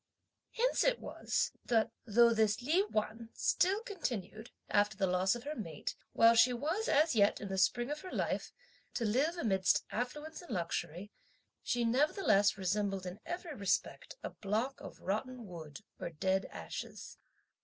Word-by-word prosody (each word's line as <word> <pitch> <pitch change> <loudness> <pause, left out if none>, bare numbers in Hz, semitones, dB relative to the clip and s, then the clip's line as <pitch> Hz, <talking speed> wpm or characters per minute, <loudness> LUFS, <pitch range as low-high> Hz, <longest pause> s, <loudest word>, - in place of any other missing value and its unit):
Hence - - +2
it - - +2
was - - -1
that, 230 -1 +2 0.2
though 235 +2 +6
this 220 0 +2
Li 330 +9 +3
Wan 220 +1 -2
still 390 +5 +2
continued, 240 - -4 0.2
after 205 0 +2
the 190 - +2
loss 185 +3 +2
of 240 - -7
her 295 +2 -4
mate, 165 - -5 0.2
while 230 0 +7
she 240 +2 +6
was 320 - -1
as 310 +2 +4
yet 205 -3 +3
in 200 - -6
the 190 - -2
spring 240 +7 +2
of 300 +1 -4
her 370 - -8
life, - - -2 0.4
to 235 - 0
live 275 +11 +1
amidst 190 - +2
affluence 295 +8 -4
and 350 - -14
luxury, 175 0 -3 0.5
she 240 -1 0
nevertheless 230 - +3
resembled 195 0 -1
in 180 +3 -6
every 350 -2 -4
respect 220 - -1
a - - -4
block 220 +7 -2
of - - -10
rotten 235 +5 -3
wood 160 -6 -9 0.2
or - - -3
dead 190 +4 0
ashes. - - -7
230 Hz, 160 wpm, -34 LUFS, 195-295 Hz, 0.5 s, while